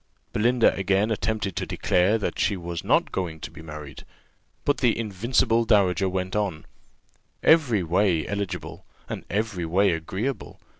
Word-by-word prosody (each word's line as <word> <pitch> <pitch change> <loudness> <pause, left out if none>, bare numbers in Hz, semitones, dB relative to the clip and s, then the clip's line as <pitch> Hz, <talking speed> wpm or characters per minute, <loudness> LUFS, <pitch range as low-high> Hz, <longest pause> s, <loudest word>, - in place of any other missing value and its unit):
Belinda 120 +2 +3
again 95 +3 +1
attempted 110 -3 -1
to - - -2
declare 95 +5 +2
that 105 - -3
she 100 - +1
was 85 -1 -5
not - - +2
going 85 -4 -3
to - - -7
be 80 - -11
married; 75 -3 -9 0.6
but 145 - +2
the 120 -4 +2
invincible 115 +2 +1
dowager 95 -4 +3
went 95 +1 -3
on: 100 -7 -2 0.8
"Every 130 - +4
way 85 -1 +2
eligible, 100 -1 -4 0.2
and - - -5
every 100 -5 -2
way 95 +4 +3
agreeable. 95 +11 -4
100 Hz, 145 wpm, -25 LUFS, 90-110 Hz, 0.8 s, Every